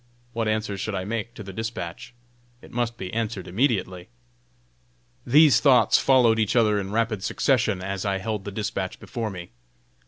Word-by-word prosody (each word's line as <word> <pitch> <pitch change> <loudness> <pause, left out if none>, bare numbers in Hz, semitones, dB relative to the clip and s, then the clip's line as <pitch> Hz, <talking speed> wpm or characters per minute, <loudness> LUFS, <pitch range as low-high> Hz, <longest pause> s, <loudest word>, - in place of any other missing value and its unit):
What 115 -1 -1
answer 110 -2 -1
should 105 +1 -3
I 95 0 -3
make 115 +3 -4
to 110 - -8
the 95 -1 -9
dispatch? 110 +2 -6 0.4
It - - -16
must 120 -1 -2
be 90 -1 -6
answered 105 -5 -3
immediately! 95 -4 -1 1.2
These 145 +3 +6
thoughts 135 -4 +5
followed 120 -4 +4
each 110 +1 +1
other 105 -3 +3
in 95 0 -5
rapid 110 -2 -1
succession 110 -9 +1
as 95 0 -3
I 100 -1 0
held 105 +1 -4
the 100 - -6
dispatch 100 -2 -4
before 115 -2 -4
me. 90 -3 -9
110 Hz, 165 wpm, -24 LUFS, 95-115 Hz, 1.2 s, These